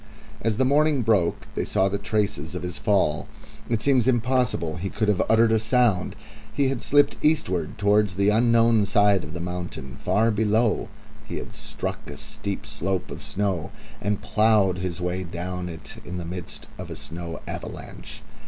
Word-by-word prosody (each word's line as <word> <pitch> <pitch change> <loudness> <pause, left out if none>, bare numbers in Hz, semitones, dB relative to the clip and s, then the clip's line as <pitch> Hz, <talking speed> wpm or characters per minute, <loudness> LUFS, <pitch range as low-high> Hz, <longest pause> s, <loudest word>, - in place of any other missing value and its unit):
As 110 -1 0
the 130 - +3
morning 145 0 +3
broke 105 -6 +2
they - - -1
saw 95 - +2
the 100 +1 -1
traces 100 -6 -1
of 90 - -4
his 90 0 -4
fall. 100 -8 +1 0.4
It 115 -2 0
seems 130 -4 +3
impossible 125 -9 +1
he 95 +3 -3
could 110 - -1
have 105 -3 +3
uttered 115 0 +5
a 110 - +4
sound. 110 -4 +2 0.4
He 140 -1 +1
had 135 -3 -2
slipped 145 0 +3
eastward 95 - +1
towards 105 -2 +3
the 100 +1 +3
unknown 115 -1 +4
side 100 -3 +4
of 75 0 -8
the - - -4
mountain; 85 -7 -5
far 115 +2 +2
below 110 +1 +1 0.4
he - - -5
had - - -7
struck - - -5
a - - -7
steep 100 -1 -4
slope 95 0 -3
of - - -7
snow, 95 -5 -1 0.3
and 105 0 -1
ploughed 105 -4 +3
his 90 -1 -3
way 90 +1 -2
down 90 +1 -4
it 80 -2 -9
in 90 +1 -6
the 85 - -4
midst 90 0 -6
of - - -6
a - - -5
snow 85 0 -6
avalanche. - - -7
100 Hz, 175 wpm, -25 LUFS, 90-115 Hz, 0.4 s, uttered